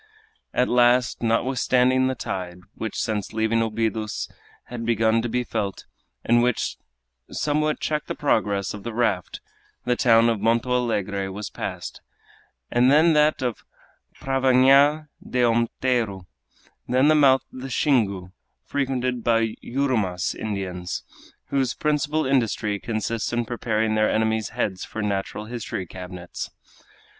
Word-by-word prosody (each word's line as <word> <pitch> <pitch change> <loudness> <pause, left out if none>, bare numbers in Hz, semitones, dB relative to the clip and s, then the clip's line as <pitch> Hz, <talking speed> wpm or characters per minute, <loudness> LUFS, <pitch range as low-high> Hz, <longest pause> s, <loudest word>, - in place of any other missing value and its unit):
At 125 - +1
last, 120 0 +3
notwithstanding 130 +2 +2
the 130 - -1
tide, 90 -5 -5
which 110 - -5
since 110 -3 -2
leaving 110 +1 +1
Obidos 110 -1 -2 0.4
had 120 -1 -7
begun 115 -1 +2
to 120 - -3
be 125 +2 0
felt, 100 -4 -4 0.4
and 120 +1 +4
which 125 -1 0 0.5
somewhat 150 +1 0
checked 150 -1 -2
the - - -3
progress 100 -9 0
of 105 - -7
the 115 +2 -6
raft, 105 -7 -1 0.4
the 125 - +2
town 115 -2 +5
of 115 -2 +1
Monto 115 +3 +1
Alegre 100 -6 -1
was 100 +2 -6
passed, - - -6 0.7
then 145 +7 +5
that 150 -2 +3
of 120 -3 -3 0.6
Pravnha 135 +3 +4 0.2
de 125 -1 0
Onteiro, 115 -4 0 0.6
then 130 +3 +3
the 155 - +6
mouth 135 -3 +5
of 130 - -8
the 135 - -6
Xingu, 105 - +1 0.3
frequented 130 -3 -1
by 115 -1 +2
Yurumas 115 -9 0
Indians, 95 -4 -4 0.5
whose 135 -3 0
principal 150 +1 0
industry 115 -5 0
consists 110 0 -2
in 120 0 -1
preparing 110 -2 -1
their 110 0 +2
enemies' 110 0 0
heads 105 -5 -2
for 110 - -5
natural 100 +1 -2
history 110 -5 -5
cabinets. 90 0 -7
115 Hz, 130 wpm, -24 LUFS, 105-130 Hz, 0.7 s, the